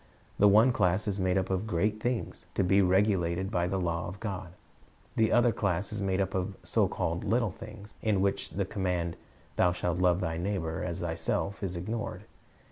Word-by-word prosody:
The 105 - +7
one 110 +5 +6
class 100 -2 +1
is 100 -1 -1
made 95 0 +2
up 95 0 -1
of 95 +3 -1
great 105 +3 0
things, 120 +1 -3
to - - +2
be 95 +2 +4
regulated 95 -1 +2
by 85 0 +1
the 95 +1 -1
law 85 -1 -1
of 95 +3 -8
God; 95 -5 -5 0.6
the 110 0 +3
other 120 0 +5
class 100 -1 -1
is 105 - -3
made 95 -1 0
up 95 -1 0
of 95 -1 -2
so - - +2
called 85 +1 -2
little 115 0 +1
things, 105 0 -11
in 105 -3 +1
which 100 +1 0
the 100 0 -2
command, 90 -4 -2 0.4
"Thou 90 -1 +4
shalt 90 -1 -1
love 90 -1 +3
thy 80 -3 -2
neighbor 85 -3 -2
as 90 +1 -3
thyself," 85 +3 -2
is 95 -3 -2
ignored. 110 +6 -4
95 Hz, 195 wpm, -29 LUFS, 90-105 Hz, 0.6 s, The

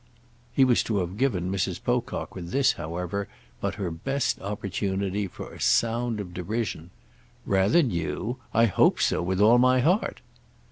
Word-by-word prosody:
He 135 +2 +4
was 125 -2 +4
to 110 - 0
have 90 -1 -2
given 95 -9 0
Mrs. 95 -1 -1
Pocock 120 0 -2
with 85 -2 -7
this, 135 +7 +3
however, 90 +4 -4 0.3
but - - -2
her 95 -4 -3
best 130 +10 -2
opportunity 100 0 -2
for - - -9
a - - -11
sound 115 -1 +1
of 90 -3 -6
derision. 90 -2 -3 0.6
"Rather 100 - +3
new? 85 - -2
I 115 +1 +4
hope 105 - +3
so - - +1
with 95 +2 -1
all 115 +4 +6
my 130 +1 +4
heart!" 180 - +1
100 Hz, 155 wpm, -26 LUFS, 90-120 Hz, 0.6 s, all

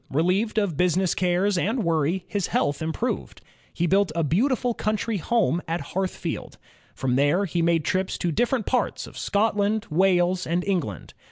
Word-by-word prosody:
Relieved 185 +9 +1
of 200 -7 +1
business 180 +1 +2
cares 185 +1 +1
and 220 +6 0
worry 165 +2 0
his 200 -4 -2
health 145 +1 0
improved. 160 +10 -3 0.3
He 175 - -1
built 195 +1 +2
a 165 - +1
beautiful 245 - +1
coimtry 215 -1 -1
home 180 -3 +1
at 165 +1 -1
Hearthfield. 190 0 -3 0.4
From 130 -1 0
there 145 +8 +3
he 175 -2 -1
made 165 -2 +2
trips 185 0 -1
to 175 - -1
different 240 - 0
parts 250 - -1
of - - -13
Scotland, 210 0 0
Wales, 180 +1 +2
and 170 +2 0
England. 170 - -3
185 Hz, 160 wpm, -25 LUFS, 165-205 Hz, 0.4 s, there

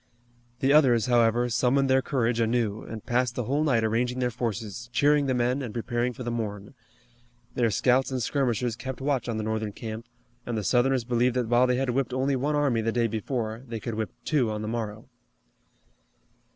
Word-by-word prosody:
The 135 +1 +3
others, 125 -7 +5
however, 120 0 +3
summoned 130 +3 +2
their 130 0 +4
courage 120 -4 0
anew, 115 -2 0
and 110 -2 -8
passed 125 0 0
the 125 - -1
whole 140 +6 0
night 125 -7 +2
arranging 120 +3 0
their 125 -1 0
forces, 115 -1 -4
cheering 145 +2 +3
the 130 - +1
men, 125 +3 +1
and 120 -4 -6
preparing 120 +1 -1
for 125 +1 -8
the 120 - -3
morn. 105 -3 -4 0.8
Their 120 -2 +2
scouts 125 +6 +2
and 130 -1 -2
skirmishers 120 -2 0
kept 130 +1 -6
watch 135 -3 -1
on 115 - -2
the 110 - -2
Northern 110 -1 -2
camp, 110 +2 -7 0.4
and 120 -2 -3
the 105 - -2
Southerners 130 +2 +2
believed 120 +1 +1
that 125 -3 -1
while 120 +1 +4
they 125 0 +1
had 130 -1 0
whipped 130 0 -1
only 135 +1 +1
one 145 +4 0
army 140 -6 +2
the 115 +1 0
day 120 0 +1
before, 115 0 -3
they 115 -1 -5
could 115 - -5
whip 110 0 -2 0.2
two 140 -7 +2
on 105 0 -3
the - - -4
morrow. 110 -1 -4
120 Hz, 200 wpm, -26 LUFS, 115-130 Hz, 0.8 s, others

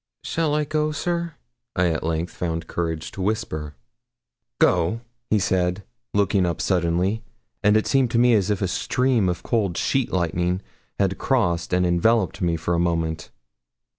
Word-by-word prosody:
'Shall 160 -3 0
I 150 - +2
go, 155 +1 0
sir?' 170 +1 -2 0.4
I 90 -1 +3
at 80 -2 -1
length 80 +2 -2
found 85 -1 -3
courage 80 -2 -3
to 95 - -7
whisper. 80 -8 -2 0.8
'Go?' 100 - +2 0.3
he 110 - +3
said, 90 0 0 0.3
looking 100 -1 +3
up 85 -2 -1
suddenly; 90 +4 +1 0.4
and 105 0 +4
it 110 - +1
seemed 135 -3 +2
to 115 - 0
me 120 0 +5
as 105 -2 +2
if 105 -1 0
a - - +1
stream 125 +1 +1
of 90 - -3
cold 100 -7 0
sheet 135 -3 0
lightning 90 +1 0 0.3
had 95 -1 0
crossed 90 -11 +1
and 90 0 +2
enveloped 95 +4 +2
me 85 -2 +1
for 80 +2 -2
a 85 - +1
moment. 80 -2 -1
95 Hz, 165 wpm, -23 LUFS, 85-115 Hz, 0.8 s, me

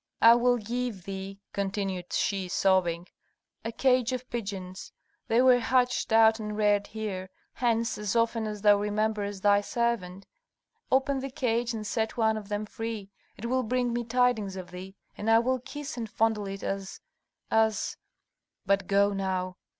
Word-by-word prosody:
I 230 +1 +10
will 245 +1 +3
give 235 -3 -3
thee," 195 +1 -7
continued 195 -2 -3
she, 195 -2 0
sobbing, 180 -2 +1 0.6
"a 225 - -3
cage 250 +1 +2
of 255 0 -4
pigeons. 195 -5 -5 0.4
They 235 +3 +4
were 255 -1 +6
hatched 250 0 +1
out 220 0 +6
and 210 -1 -4
reared 205 -1 +2
here; 200 -4 -5 0.2
hence, 230 -2 0
as 210 +1 -2
often 230 -1 +1
as 210 -1 -6
thou 205 -1 +6
rememberest 205 -1 -1
thy 205 0 +5
servant, 205 -5 -2 0.7
open 270 +1 +2
the 270 +1 -4
cage 240 -4 0
and 215 -1 -5
set 220 +2 -2
one 220 -1 +3
of 215 -2 -7
them 210 +1 -2
free; 220 -2 -6 0.3
it 230 - -7
will 255 +2 +1
bring 245 0 0
me 240 0 -1
tidings 230 -4 +1
of 185 -1 -8
thee, 185 +2 -9 0.2
and 210 - -3
I 225 - +7
will 255 +3 +1
kiss 290 +4 -7
and 225 -2 -4
fondle 220 -2 0
it 195 0 -6
as 195 -1 -4 0.5
as 220 -1 +2 0.7
But 200 -1 +1
go 200 +1 +3
now!" 185 -2 -2
215 Hz, 165 wpm, -28 LUFS, 195-235 Hz, 0.7 s, I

